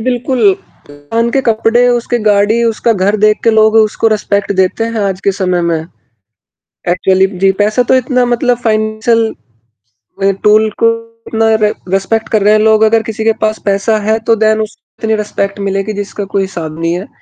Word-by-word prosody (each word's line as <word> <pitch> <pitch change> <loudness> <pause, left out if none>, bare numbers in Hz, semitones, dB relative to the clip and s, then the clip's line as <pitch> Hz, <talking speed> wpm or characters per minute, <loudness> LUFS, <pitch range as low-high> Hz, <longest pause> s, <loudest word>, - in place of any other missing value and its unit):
बिल्कुल 245 -4 +1 0.6
उनके 235 +4 +1
कपड़े, 230 +1 +2
उसकी 240 0 0
गाड़ी, 210 +1 +2
उसका 230 0 +1
घर 200 +1 0
देख 215 +1 +2
के 230 - +5
लोग 220 0 +3
उसको 220 +1 +2
रिस्पेक्ट 205 -2 -1
देते 190 +4 0
हैं 230 -1 -3
आज 190 0 -4
के 200 - +2
समय 180 -2 -1
में, 170 -1 0 1.1
एक्चुअली 190 +2 +2
जी, 195 +1 +3
पैसा 210 +5 +1
तो 255 - +2
इतना 255 0 +1
मतलब 245 0 0
फ़ाइनेंशियल 220 - -1 0.9
टूल 215 +1 +4
को 230 - +4 0.4
उतना 225 0 +1
रि 210 - +4 0.2
रिस्पेक्ट 195 +4 -1
कर 215 - +1
रहे 210 +1 +4
हैं 215 - +3
लोग, 220 0 +3
अगर 220 0 +3
किसी 220 0 -5
के 225 - +3
पास 215 0 0
पैसा 200 +2 +1
है 220 +1 0
तो 230 - +4
देन 220 0 +1
उसके 220 +1 -8
लिये 220 0 +1
रिस्पेक्ट 200 -1 -3
मिलेगी 195 +1 -2
जिसका 205 0 -5
कोई 200 - +1
हिसाब 165 -5 -5
नहीं 165 0 -1
है, 180 +4 -5
215 Hz, 180 wpm, -12 LUFS, 200-225 Hz, 1.1 s, के